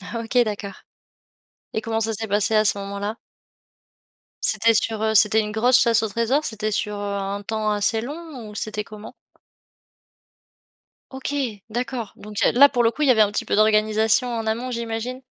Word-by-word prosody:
OK 230 Hz, +2 st, -3 dB
d'accord. 205 Hz, -2 st, -6 dB, 0.9 s
Et 220 Hz, -, -1 dB
comment 225 Hz, 0 st, -2 dB
ça 225 Hz, 0 st, 0 dB
s'est 220 Hz, +1 st, -1 dB
passé 205 Hz, +2 st, +1 dB
à 215 Hz, 0 st, +4 dB
ce 205 Hz, -, +4 dB
moment-là? 200 Hz, +2 st, -4 dB, 1.3 s
C'était 230 Hz, 0 st, +3 dB
sur, 220 Hz, 0 st, 0 dB
heu, 220 Hz, 0 st, +1 dB
c'était 215 Hz, +1 st, +5 dB
une 210 Hz, 0 st, -4 dB
grosse 240 Hz, +4 st, +4 dB
chasse 230 Hz, -2 st, +3 dB
au 220 Hz, -, -1 dB
trésor? 230 Hz, +8 st, 0 dB
C'était 215 Hz, -1 st, -2 dB
sur, 210 Hz, 0 st, -1 dB
heu, -, -, -6 dB, 0.2 s
un 200 Hz, +1 st, -4 dB
temps 215 Hz, 0 st, -2 dB
assez 210 Hz, +2 st, +1 dB
long? 285 Hz, -1 st, -8 dB
Ou 210 Hz, -, -12 dB
c'était 210 Hz, 0 st, -3 dB
comment? 215 Hz, +1 st, -11 dB, 2.0 s
OK, 265 Hz, +2 st, -5 dB, 0.4 s
d'accord, 240 Hz, -1 st, -4 dB
donc 210 Hz, 0 st, -11 dB
il -, -, +3 dB
y -, -, +6 dB
a -, -, 0 dB
là, 280 Hz, +4 st, +7 dB
pour 245 Hz, -3 st, +1 dB
le 230 Hz, -, +3 dB
coup 300 Hz, -, -8 dB
il 295 Hz, -, +3 dB
y -, -, +7 dB
avait 220 Hz, -3 st, +4 dB
un 205 Hz, -1 st, +3 dB
petit -, -, -1 dB
peu -, -, 0 dB
d'organisation 215 Hz, +3 st, +3 dB
en 225 Hz, -1 st, -3 dB
amont, 230 Hz, +3 st, -2 dB
j'imagine? 235 Hz, +1 st, -4 dB
220 Hz, 190 wpm, -22 LUFS, 210-235 Hz, 2.0 s, là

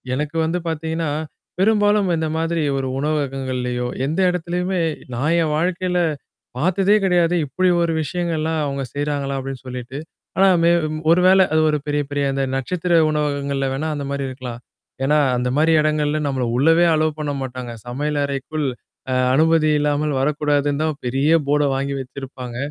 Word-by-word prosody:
எனக்கு 150 Hz, +3 st, -3 dB
வந்து 175 Hz, +2 st, -1 dB
பார்த்தீங்கன்னா, 160 Hz, 0 st, -2 dB, 0.5 s
பெரும்பாலும் 205 Hz, -1 st, +3 dB
இந்த 160 Hz, 0 st, -1 dB
மாதிரி 165 Hz, -1 st, 0 dB
ஒரு 135 Hz, -1 st, -2 dB
உணவககங்கள்லயோ, 130 Hz, -4 st, -2 dB, 0.2 s
எந்த 160 Hz, +5 st, -2 dB
இடத்தலயுமே 180 Hz, +1 st, -2 dB, 0.3 s
நான் 150 Hz, +7 st, +1 dB
என் 155 Hz, -2 st, 0 dB
வாழ்க்கையில 180 Hz, +1 st, 0 dB, 0.6 s
பார்த்ததே 190 Hz, +5 st, +3 dB
கிடையாது. 175 Hz, -1 st, +3 dB
இப்பிடி 185 Hz, +5 st, +1 dB
ஒரு 165 Hz, -, 0 dB
விஷயங்கள்லாம் 160 Hz, -1 st, -1 dB
அவுங்க 140 Hz, -1 st, -3 dB
செய்றாங்களா? 145 Hz, -1 st, -2 dB
அப்பிடின்னு 135 Hz, -1 st, -7 dB
சொல்லிட்டு. 125 Hz, +1 st, -6 dB, 0.4 s
ஆனா 195 Hz, -, +6 dB, 0.2 s
மே 170 Hz, -, +5 dB, 0.4 s
ஒரு 170 Hz, -, +5 dB
வேளை 190 Hz, 0 st, +6 dB
அது 155 Hz, -, +4 dB
ஒரு 150 Hz, -, +1 dB
பெரிய, 145 Hz, 0 st, +1 dB
பெரிய 145 Hz, 0 st, -1 dB
அந்த 135 Hz, 0 st, -1 dB
நட்சத்திர 175 Hz, +6 st, -1 dB, 0.2 s
உணவகங்கள்ல 140 Hz, -2 st, -1 dB
வேணா 155 Hz, +4 st, -2 dB
அந்தமாரி 140 Hz, -1 st, -3 dB
இருக்கலாம். 125 Hz, -2 st, -7 dB, 0.4 s
ஏன்னா, 150 Hz, +3 st, +3 dB, 0.2 s
அந்தமாரி 140 Hz, +6 st, +2 dB
இடங்கள்ல 150 Hz, 0 st, +1 dB
நம்மள 130 Hz, -2 st, -1 dB
உள்ளவே 165 Hz, +5 st, +4 dB
அலோ 155 Hz, 0 st, +2 dB
பண்ண 150 Hz, -1 st, -2 dB
மாட்டாங்க. 125 Hz, -2 st, -5 dB
"சமையல் 145 Hz, +4 st, -2 dB
அறைக்குள் 140 Hz, +2 st, -3 dB, 0.5 s
அ -, -, +1 dB, 0.2 s
அனுமதி 160 Hz, +2 st, +3 dB
இல்லாமல் 150 Hz, 0 st, 0 dB
வரக்கூடாதுன்னு." 145 Hz, 0 st, +1 dB
தான் 155 Hz, -2 st, -2 dB
பெரிய 135 Hz, +5 st, +1 dB, 0.2 s
போர்ட 145 Hz, 0 st, +2 dB
வாங்கி 140 Hz, +1 st, -2 dB
வச்சிருப்பாங்க. 130 Hz, -2 st, -7 dB
150 Hz, 145 wpm, -21 LUFS, 135-165 Hz, 0.6 s, ஆனா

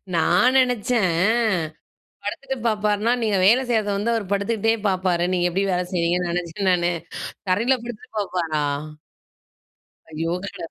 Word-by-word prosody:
நான் 185 Hz, +10 st, +4 dB
நினைச்சேன் 235 Hz, -8 st, +1 dB, 1.1 s
படுத்துட்டு 265 Hz, +6 st, -4 dB
பார்ப்பார்னா, 210 Hz, +1 st, +1 dB
நீங்க 215 Hz, -3 st, +1 dB
வேலை 235 Hz, +6 st, +6 dB
செய்றது 220 Hz, -3 st, +1 dB
வந்து 215 Hz, +4 st, 0 dB
அவரு 225 Hz, -3 st, -1 dB
படுத்துக்கிட்டே 220 Hz, +2 st, +1 dB, 0.2 s
பார்ப்பாரு. 185 Hz, -2 st, 0 dB
நீங்க 180 Hz, -1 st, +1 dB
எப்படி 195 Hz, +3 st, 0 dB
வேலை 180 Hz, 0 st, 0 dB
செய்றீங்கன்னு 175 Hz, 0 st, 0 dB
நினைச்சேன் 180 Hz, +3 st, -1 dB
நானு. 175 Hz, 0 st, +2 dB, 0.6 s
தரையிலே 235 Hz, +8 st, +2 dB
படுத்துட்டு 235 Hz, -2 st, -9 dB
பாப்பாரா? 170 Hz, -6 st, -1 dB, 1.5 s
ஐயோ! 165 Hz, +2 st, -2 dB
கட 200 Hz, -, -7 dB
200 Hz, 125 wpm, -23 LUFS, 175-225 Hz, 1.5 s, வேலை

